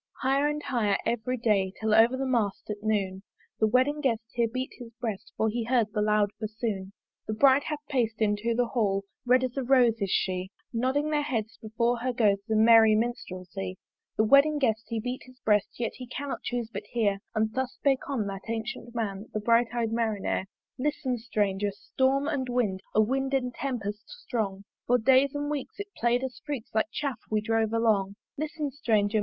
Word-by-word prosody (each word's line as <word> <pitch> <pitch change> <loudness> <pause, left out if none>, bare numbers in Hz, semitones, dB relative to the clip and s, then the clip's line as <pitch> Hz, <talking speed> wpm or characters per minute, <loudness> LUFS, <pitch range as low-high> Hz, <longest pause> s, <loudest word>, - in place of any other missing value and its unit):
Higher 275 +2 +3
and 295 0 -2
higher 215 -6 +1
every 240 +2 -1
day, 200 -5 +1
Till 220 -1 +1
over 230 +4 +5
the 270 - -1
mast 225 -5 -1
at 205 0 -6
noon 200 -3 -1 0.4
The 220 - +4
wedding 260 +6 +2
guest 235 -5 +1
here 235 -1 +2
beat 255 +2 -3
his 240 -2 -8
breast, 225 -2 -4
For 220 - +2
he 230 +2 -1
heard 230 -3 +1
the 210 - 0
loud 210 -1 +2
bassoon. 215 -3 -3 0.4
The 215 - -2
Bride 270 +4 +5
hath 300 -1 -4
pac'd 230 -5 0
into 215 +2 +1
the 245 +1 +2
Hall, 205 -5 0 0.2
Red 255 +1 +5
as 255 -1 -2
a 270 - 0
rose 245 -3 +4
is 195 - 0
she; 185 0 0 0.2
Nodding 265 +6 0
their 300 -1 +2
heads 230 -7 -3
before 235 +2 0
her 255 +2 -1
goes 210 -4 +3
The 220 - 0
merry 220 0 +7
Minstralsy. 190 -5 -3 0.4
The 215 - +4
wedding 280 +6 +5
guest 225 -6 +1
he 230 - -2
beat 250 +3 -4
his 255 0 -17
breast, 210 -1 +1
Yet 235 - -1
he 250 0 -8
cannot 275 +3 -5
chuse 240 -2 -3
but 205 +1 -5
hear: 205 -4 +1 0.2
And 220 0 +1
thus 260 +1 -2
spake 275 -1 0
on 250 -7 -1
that 195 -1 -5
ancyent 230 +1 -4
Man, 210 -2 -3
The - - +1
bright 230 +2 +3
eyed 235 -2 -1
Marinere. 220 -4 -1 0.3
Listen, 260 -3 -1
Stranger! 205 -3 0
Storm 265 +7 0
and 275 -5 -1
Wind, 215 -7 0
A 215 - +6
Wind 270 +4 0
and 250 -2 -1
Tempest 220 -6 -4
strong! 215 - -3 0.2
For 245 - +5
days 265 +4 +4
and 290 0 -2
weeks 290 +6 -5
it 405 0 -6
play'd 240 +2 +1
us 260 -1 -5
freaks 285 -6 -5
Like 220 +5 +2
Chaff 275 -6 -3
we 215 - +2
drove 220 0 0
along. 215 -4 +2 0.2
Listen, 300 -1 -3
Stranger! 220 -6 +1
230 Hz, 195 wpm, -28 LUFS, 215-260 Hz, 0.4 s, merry